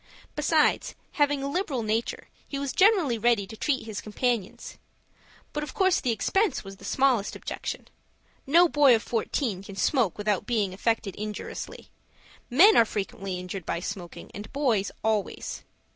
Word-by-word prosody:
Besides, - - +2 0.2
having 290 -2 +1
a - - -1
liberal 280 - -1
nature, 220 +2 -2 0.2
he 280 - -4
was 280 -1 -3
generally 370 - +4
ready 230 -3 +2
to 220 - -10
treat 265 +1 -1
his 215 -2 -5
companions. 220 -2 -3 0.7
But 300 - -2
of 300 - -6
course 380 -2 +3
the 250 - -1
expense 280 - +1
was 195 -1 -10
the - - -13
smallest 255 -6 +1
objection. - - -5 0.6
No 340 +5 +6
boy 290 -6 +5
of 225 - -2
fourteen 225 -3 -1
can 195 0 -10
smoke 220 - +1
without 205 -2 -1
being 210 -6 0
affected 225 0 -1
injuriously. 210 0 -6 0.6
Men 370 - +7
are - - +8
frequently 195 -3 -4
injured 180 +1 -6
by 170 - -2
smoking, 180 -1 -7
and 205 +2 -8
boys 245 -8 +1
always. 215 -2 -2
230 Hz, 155 wpm, -27 LUFS, 205-280 Hz, 0.7 s, are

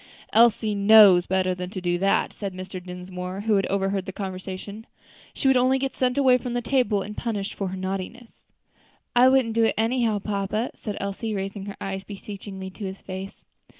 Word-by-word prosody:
"Elsie 225 -1 +4
knows 200 -3 +7
better 185 0 +1
than 180 0 -5
to 190 - -5
do 175 -1 -1
that," 195 +1 +1
said 195 -3 -6
Mr. 185 0 -7
Dinsmore, 180 +1 -6
who 220 +1 +1
had 195 - 0
overheard 195 -1 -1
the - - -3
conversation; 190 +3 -7 0.5
"she - - 0
would 265 - +5
only 255 +1 +4
get 270 0 -3
sent 250 0 0
away 260 -2 +5
from 250 -2 -5
the 245 - -1
table 225 -5 +1
and 210 +2 -8
punished 210 -4 -3
for 195 - -3
her 190 +1 -5
naughtiness." 195 +5 -6 0.7
"I 250 +1 +7
wouldn't 260 -4 +3
do 230 0 +3
it - - +1
anyhow, 225 -1 +1
papa," 205 +3 -2
said 210 -2 -6
Elsie, 200 +2 -3
raising 195 0 -4
her 200 - -7
eyes 195 0 -4
beseechingly 195 -1 -8
to 205 - -10
his 190 0 -6
face. 190 +1 -8
200 Hz, 190 wpm, -25 LUFS, 190-225 Hz, 0.7 s, knows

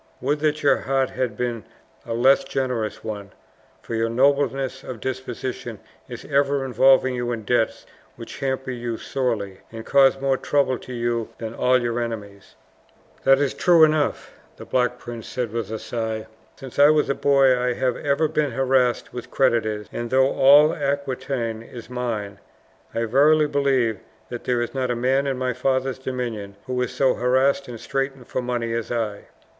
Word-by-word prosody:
"Would 145 +4 0
that 155 0 0
your 140 - +4
heart 135 -1 0
had 120 -5 -3
been 120 -3 -2 0.4
a 115 - -2
less 130 +4 +4
generous 125 -5 -3
one, 105 -3 -6 0.5
for - - -7
your 115 0 0
nobleness 135 +1 +1
of 125 -3 -7
disposition 130 0 -5 0.3
is - - -8
ever 140 -1 +1
involving 130 +1 +4
you 120 -1 -2
in 115 -2 -4
debts 115 +1 0 0.3
which - - -10
hamper 130 -1 -2
you 120 -2 -4
sorely, 110 -9 -3
and 115 0 -8
cause 135 -1 +4
more 135 -1 +1
trouble 130 -3 +1
to - - -11
you 120 -1 -2
than 110 -1 -6
all 130 +2 +3
your 120 -1 -2
enemies!" 105 -4 -6 0.7
"That 135 0 +6
is 140 -1 0
true 170 -3 +5
enough," 155 -1 +1 0.2
the - - -10
Black 125 -1 0
Prince 120 -2 -8
said 125 -4 -3
with 115 -3 -3
a 110 - -3
sigh. 110 -1 -4 0.3
"Since 135 0 -9
I 145 +1 +8
was 155 -1 +3
a - - +1
boy 135 -2 +4
I 125 0 0
have 125 0 0
ever 145 +2 +1
been 150 -3 -1
harassed 130 -1 +1
with 125 - -7
creditors; 110 -5 +1
and 120 0 -4
though 130 +2 +3
all 145 +3 +6
Aquitaine 135 -5 -2
is 120 +1 -11
mine, 110 -5 -4 0.6
I 115 - 0
verily 150 +6 +4
believe 135 -7 +1 0.3
that 120 - -7
there 125 -1 +1
is 120 - -6
not 130 -2 -1
a 120 - 0
man 130 +3 +1
in 135 -2 -1
my 130 0 -1
father's 130 +1 -1
dominions 120 -6 -4
who 125 -1 -2
is 125 - -1
so 135 -2 +2
harassed 130 +3 +1
and 120 -2 -8
straitened 135 0 -3
for 130 - -3
money 120 -2 -2
as 115 -1 -3
I." 110 -4 -3
125 Hz, 175 wpm, -23 LUFS, 115-135 Hz, 0.7 s, I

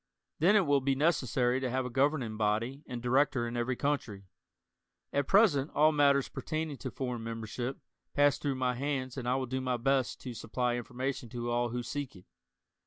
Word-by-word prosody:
Then, 185 +7 +5
it 200 -4 +5
will 145 -2 +3
be 135 +1 +1
necessary 130 -4 +2
to 130 -1 -2
have 130 +1 -1
a - - -3
governing 135 -4 +1
body 110 +6 -1
and 120 -1 -6
director 130 0 +2
in 120 - -5
every 120 +2 0
country. 120 -9 -2 0.9
At 140 -1 +1
present 175 -9 +4
all 155 +1 +5
matters 140 -2 +3
pertaining 155 -2 -4
to 130 - -5
foreign 125 -2 -4
membership 115 +3 -4 0.4
pass 145 -1 +4
through 140 -2 -1
my 130 -1 0
hands 130 -1 -2
and 125 -3 -3
I 125 - +2
will 130 0 -1
do 130 +1 -3
my 125 -1 0
best 130 +1 +1
to 125 - -6
supply 120 +2 -1
information 125 0 -4
to 120 0 -4
all 120 0 +1
who 120 +1 -3
seek 145 -3 -5
it. 90 - -15
130 Hz, 190 wpm, -31 LUFS, 120-140 Hz, 0.9 s, Then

